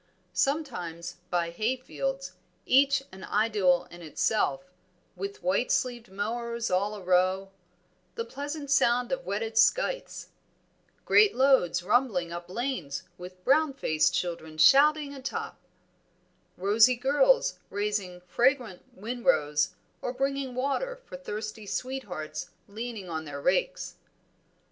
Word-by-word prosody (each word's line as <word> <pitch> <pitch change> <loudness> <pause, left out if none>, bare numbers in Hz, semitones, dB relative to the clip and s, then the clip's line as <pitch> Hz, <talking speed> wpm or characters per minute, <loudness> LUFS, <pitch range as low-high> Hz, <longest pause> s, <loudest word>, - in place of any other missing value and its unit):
Sometimes 180 - -2
by 170 -1 0
hayfields, 260 - -2 0.3
each 270 +1 +4
an 190 0 -11
idyl 195 -6 +2
in 175 - -11
itself, 175 0 -1 0.4
with 195 0 -6
white 190 +7 +1
sleeved 240 -2 -1
mowers 235 +3 -3
all 200 +3 +1
arow; 185 0 +1 0.6
the 460 -1 -3
pleasant 285 +1 -5
sound 245 -3 +3
of 265 -9 -3
whetted 220 +3 -1
scythes; - - +1 0.8
great 420 -1 +5
loads 250 -10 +3
rumbling 205 -5 +1
up 175 0 -7
lanes, 190 - -3 0.2
with 180 +1 -10
brown 290 +2 +3
faced 155 - +1
children 160 -3 -3
shouting 290 - +5
atop; 270 -1 -5 1.0
rosy 215 +6 +5
girls 385 - +3
raising 200 -3 -2
fragrant 240 +1 +1
winrows 155 -10 +1 0.3
or 250 - -3
bringing 270 -1 -2
water 280 - -1
for - - -9
thirsty 215 -4 -6
sweethearts 180 -12 -4 0.2
leaning 220 -1 -6
on 160 -2 -4
their 145 -1 -6
rakes. - - 0
220 Hz, 110 wpm, -28 LUFS, 180-270 Hz, 1.0 s, great